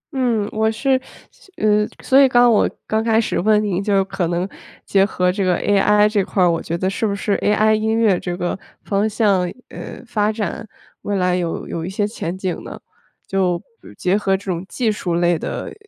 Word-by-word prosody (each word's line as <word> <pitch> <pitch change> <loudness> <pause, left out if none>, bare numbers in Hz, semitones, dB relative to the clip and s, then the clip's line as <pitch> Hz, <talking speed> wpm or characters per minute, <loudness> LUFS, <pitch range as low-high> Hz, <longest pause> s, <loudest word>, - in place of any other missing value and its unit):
嗯， 235 -6 +1
我 220 0 +1
是 260 +4 +1 0.3
所 385 - -22
呃， 210 0 +2 0.2
所 270 +1 +5
以 270 - +6
刚 245 -1 +5
我 215 - +3 0.2
刚 220 0 0
开 225 -1 +3
始 230 - -1
问 210 +3 +3
你 195 -2 -1
就 195 -2 +1
可 185 -3 -2
能 175 +2 -1 0.4
结 195 -1 +3
合 180 -2 +1
这 195 +1 -2
个 180 -1 +2
AI 210 +1 +3
这 210 -2 +1
块 195 0 -2
儿， 175 - +5
我 165 - -1
觉 170 - -3
得 185 +2 -1
是 195 +3 -1
不 200 - -1
是 200 +1 -1
AI 215 +1 +3
音 220 +1 +1
乐 210 -6 +3
这 175 -1 -4
个 175 - -2 0.3
方 205 +1 0
向， 200 -5 +1 0.2
呃， - - -9
发 215 -2 0
展， 215 0 -4 0.3
未 205 - -2
来 180 -2 +1
有 175 -2 -3
有 165 - -4
一 175 - -4
些 205 +2 -1
前 185 -4 -5
景 185 -2 -4
呢？ - - -9 0.5
就 185 -3 0 0.4
结 180 +2 +1
合 195 -2 +1
这 195 -1 -5
种 170 0 -3
技 235 -4 0
术 180 -5 -2
类 175 -1 +2
的， - - -5
205 Hz, 230 characters per minute, -20 LUFS, 180-220 Hz, 0.5 s, 以